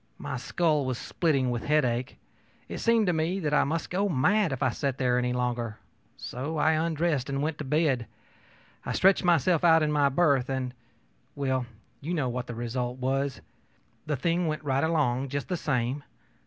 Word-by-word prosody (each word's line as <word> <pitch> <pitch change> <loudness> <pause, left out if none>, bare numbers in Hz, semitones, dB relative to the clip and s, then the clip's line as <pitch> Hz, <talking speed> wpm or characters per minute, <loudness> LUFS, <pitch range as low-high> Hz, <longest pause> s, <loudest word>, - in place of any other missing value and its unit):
My - - -5
skull 155 -5 +1
was 130 -2 -2
splitting 140 -6 0
with 120 -1 -3
headache. 130 -5 0 0.5
It - - -6
seemed 230 -2 +3
to 180 - +2
me 165 +4 0
that 150 -5 -1
I - - +5
must 160 +3 -3
go 200 +3 +1
mad 180 +5 +2
if 135 - -2
I - - +2
sat 135 -2 -2
there 125 -2 +2
any 125 0 0
longer; 120 -3 -2 0.4
so 140 +6 -5
I 155 +1 +3
undressed 160 -3 0
and 140 +1 -1
went 155 0 -2
to - - -3
bed. 140 -4 +1 0.8
I - - -3
stretched 195 +1 +4
myself 170 -1 +3
out 165 -2 +6
in 150 - +1
my 145 -2 +3
berth, 140 -4 +2
and 130 -2 -2 0.6
well, 130 -3 -1 0.3
you 165 +5 -3
know 140 -6 0
what 125 +1 -4
the 120 - -6
result 120 +1 -3
was. 135 +1 -1 0.7
The 150 -2 0
thing 170 +5 0
went 155 0 -3
right 135 -1 +1
along, 140 -5 +1
just 140 +1 -4
the 180 - 0
same. 135 -3 -1
140 Hz, 185 wpm, -27 LUFS, 125-160 Hz, 0.8 s, out